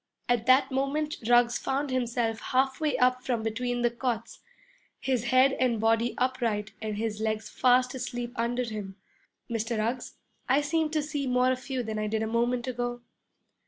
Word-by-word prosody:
At 240 -2 +1
that 260 +1 +5
moment 285 +3 -1
Ruggs 240 0 +4
found 275 +2 -1
himself 235 -3 0
halfway 265 +2 0
up 255 0 +2
from 235 -4 -1
between 245 +2 -2
the 240 - +3
cots, 235 -2 -3 0.6
his 255 -3 -1
head 255 +2 +5
and 245 -3 +2
body 225 +2 +2
upright 230 -5 0
and 215 -1 -3
his 215 -1 -2
legs 220 0 -2
fast 250 0 +3
asleep 245 -2 -4
under 240 +2 0
him. 210 -4 -6 0.5
'Mr. 230 0 -2
Ruggs, 230 +4 -2 0.3
I 275 +3 +4
seem 315 +1 0
to 305 -1 0
see 290 -2 -3
more 250 0 +3
of 255 +1 -4
you 260 -2 -1
than 215 -1 -3
I 215 - -1
did 220 +1 -1
a - - -1
moment 240 +2 0
ago.' 245 -1 -3
245 Hz, 170 wpm, -28 LUFS, 225-255 Hz, 0.6 s, that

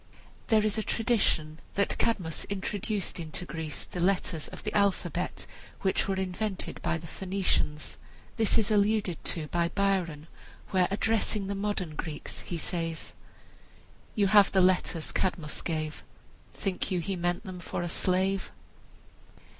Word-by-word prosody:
There 215 -1 +4
is 215 +1 +1
a - - +1
tradition 205 -10 +1 0.2
that 200 - +2
Cadmus 180 -8 0
introduced 200 0 -2
into 165 +2 -4
Greece 160 -4 -4
the 180 - -6
letters 180 -3 +1
of - - -9
the 210 - -3
alphabet 200 -2 +1 0.4
which 190 0 +2
were 195 - +1
invented 190 +1 -2
by 170 - +1
the 165 - -9
Phoenicians. 180 -4 -1 0.4
This 225 -3 +3
is 220 -1 +2
alluded 205 -4 +2
to 160 -3 0
by 170 -1 +2
Byron, 185 -7 +1 0.5
where, 185 -2 +4
addressing 215 0 +1
the 200 - -2
modern 195 -5 -1
Greeks, 155 -1 -5
he 175 - -4
says: 165 -1 -3 1.0
"You 205 - +4
have 205 0 +7
the 190 - +4
letters 180 -3 +2
Cadmus 175 -5 -1
gave, 155 -2 -3 0.5
Think 190 -2 -1
you 185 -3 +1
he 195 +3 -1
meant 175 0 0
them 185 -2 -7
for 175 - -3
a - - -1
slave?" 190 +2 +1
185 Hz, 145 wpm, -29 LUFS, 170-200 Hz, 1.0 s, have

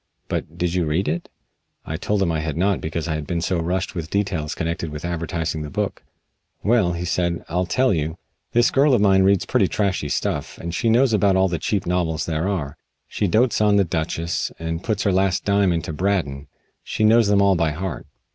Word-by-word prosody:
"But 80 - -4
did 85 -1 -1
you 90 -2 +1
read 80 +5 0
it?" 85 +3 -2 0.6
I 80 - -4
told 100 +4 0
him 85 - +1
I 80 - -1
had 80 -1 -3
not 95 +2 +1
because 80 +1 -3
I 80 - -1
had 75 -1 -4
been 85 -2 -1
so 85 +1 0
rushed 90 +3 -2
with 85 -3 -5
details 95 -7 -1
connected 85 0 -3
with 75 +2 -6
advertising 85 -2 -2
the 75 - -5
book. - - -3 0.6
"Well," 105 -5 +3
he 85 +1 -4
said, 85 -1 -1
"I'll 90 +2 0
tell 125 +7 +2
you. 80 0 -2 0.3
This 120 0 +3
girl 140 0 +4
of 115 - +2
mine 95 -2 +5
reads 95 -1 +3
pretty - - +2
trashy 95 -8 -1
stuff, - - -2
and 85 0 -6
she 115 - +1
knows 120 +1 +4
about 100 -2 +3
all 95 0 +3
the 85 -2 -2
cheap 100 -3 -1
novels 85 -3 0
there 80 +2 -1
are. 75 -8 -3 0.3
She 100 - -1
dotes 110 +5 +2
on 105 -1 +4
'The 100 - +5
Duchess,' 85 0 -2
and 80 +1 -4
puts 105 -4 -1
her 100 - +2
last 95 0 +1
dime 100 -2 +3
into 80 -2 -2
Braddon. 75 -6 -1 0.3
She - - -3
knows 110 0 +5
them 100 -1 +4
all 100 -1 +5
by 85 -2 +1
heart. 85 +3 -5
90 Hz, 215 wpm, -22 LUFS, 80-100 Hz, 0.6 s, mine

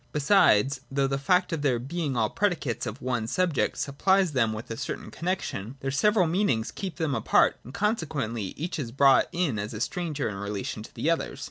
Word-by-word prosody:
Besides, 140 - +4
though 135 0 +1
the 135 0 -1
fact 180 +5 +2
of 160 - -2
their 135 -4 +2
being 140 +2 -3
all 110 -2 +1
predicates 170 - -1
of 110 +6 -7
one 120 -3 -1
subject 175 +2 0
supplies 185 +6 +2
them 120 -6 +2
with 110 +2 -6
a - - -2
certain - - -5
connexion, 150 - -3
their 135 - -2
several 200 +7 +3
meanings 160 - 0
keep 190 -6 -5
them 160 -3 -1
apart: - - +3
and 125 - -10
conse 210 - 0
quently 115 -9 -3
each 165 +2 -4
is 120 -5 -4
brought 135 +1 +5
in 170 - 0
as 105 +1 -4
a - - -5
stranger 165 -6 -2
in 105 - -4
relation 100 +1 -4
to 110 - -11
the 165 - +1
others. 165 -4 -2
140 Hz, 205 wpm, -27 LUFS, 115-175 Hz, -, brought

